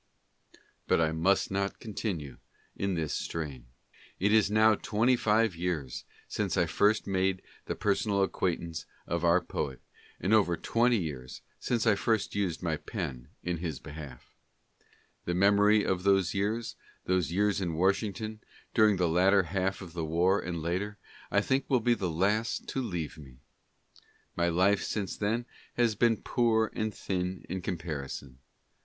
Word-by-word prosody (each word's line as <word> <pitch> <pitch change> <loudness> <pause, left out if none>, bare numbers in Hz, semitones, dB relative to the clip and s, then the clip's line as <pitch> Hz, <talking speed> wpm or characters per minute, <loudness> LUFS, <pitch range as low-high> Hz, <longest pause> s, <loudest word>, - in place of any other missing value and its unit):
But - - +3
I 80 -1 +2
must 90 +6 +2
not 100 0 -1
con 110 - -8
tinue 75 - -4 0.4
in 100 -1 -1
this 80 -3 -2
strain. 70 -7 -4 0.5
It 100 +3 +2
is 110 -3 +5
now 110 +1 +5
twenty 115 +4 +2
five 110 -3 +2
years 85 -7 -3 0.2
since 100 -4 -2
I 85 - +4
first 105 +6 +2
made 95 -1 0 0.2
the - - -2
personal 100 -1 +1
ac 95 - 0
quaintance 85 -3 -2 0.2
of 85 0 -2
our 85 +1 +5
poet, 70 -6 -4 0.4
and 95 - +1
over 95 -6 +4
twenty 120 +6 +2
years 70 -9 -5 0.2
since 120 -2 0
I 110 - +5
first 110 +1 0
used 95 -4 -1
my 80 -3 0
pen 60 -4 -5 0.2
in 90 -1 -1
his 80 -4 -4
behalf. 75 -3 -10 0.9
The 85 - -1
memory 100 +2 +5
of 95 -1 0
those 95 -2 +3
years, 110 +3 -1 0.3
those 90 -3 +1
years 100 +2 +1
in 85 -3 -2
Washington, 100 +4 0 0.3
during 110 -3 +5
the 90 -1 +2
latter 95 +4 +4
half 95 +2 -2
of 85 -3 -11
the 85 -2 -3
war 85 +5 +2
and 85 -2 -4
later, 100 +5 -2 0.3
I 100 - +3
think 135 +5 0
will 130 - +4
be 120 +1 +3
the 95 -6 -2
last 100 +8 0
to 135 - -1
leave 85 - -4
me. 65 -4 -13 1.0
My 85 0 +2
life 95 +4 +3
since 100 -3 -3
then 115 +4 -1 0.3
has 120 -2 +3
been 115 +1 +3
poor 110 -2 +1
and 110 0 -1
thin 90 -2 -3
in 95 +1 -4
comparison. 70 -7 -5
95 Hz, 160 wpm, -30 LUFS, 85-105 Hz, 1.0 s, is